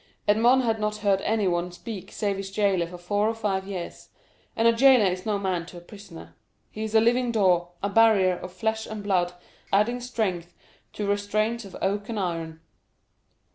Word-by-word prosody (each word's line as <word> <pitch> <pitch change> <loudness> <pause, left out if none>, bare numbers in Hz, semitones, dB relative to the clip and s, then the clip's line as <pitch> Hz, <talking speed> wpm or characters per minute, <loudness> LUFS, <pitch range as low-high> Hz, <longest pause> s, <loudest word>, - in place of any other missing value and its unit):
Edmond 235 +5 +4
had 225 -2 0
not 210 0 -1
heard 195 -1 +3
anyone 180 -5 0
speak 190 +2 -8
save 200 -2 -2
his 195 0 -5
jailer 195 -4 +1
for 180 +1 -9
four 205 +4 0
or 225 - -2
five 195 -3 -2
years; 185 -4 -7 0.5
and 225 +1 +3
a 230 - +5
jailer 255 -2 +6
is 185 +2 -2
no 210 -1 +1
man 185 -4 -2
to 180 - -11
a - - -7
prisoner—he 105 - -13
is 220 0 -4
a - - +8
living 240 +2 +2
door, 180 -5 +2
a 200 - 0
barrier 200 -4 +4
of 180 - -8
flesh 220 +4 -2
and 215 -1 -6
blood 180 -3 +1 0.4
adding 215 +5 +2
strength 195 -9 -3 0.4
to 210 - -4
restraints 210 +3 -1
of 195 - -10
oak 205 +2 -1
and 225 -2 -3
iron. 165 -3 -4
200 Hz, 180 wpm, -25 LUFS, 180-220 Hz, 0.5 s, a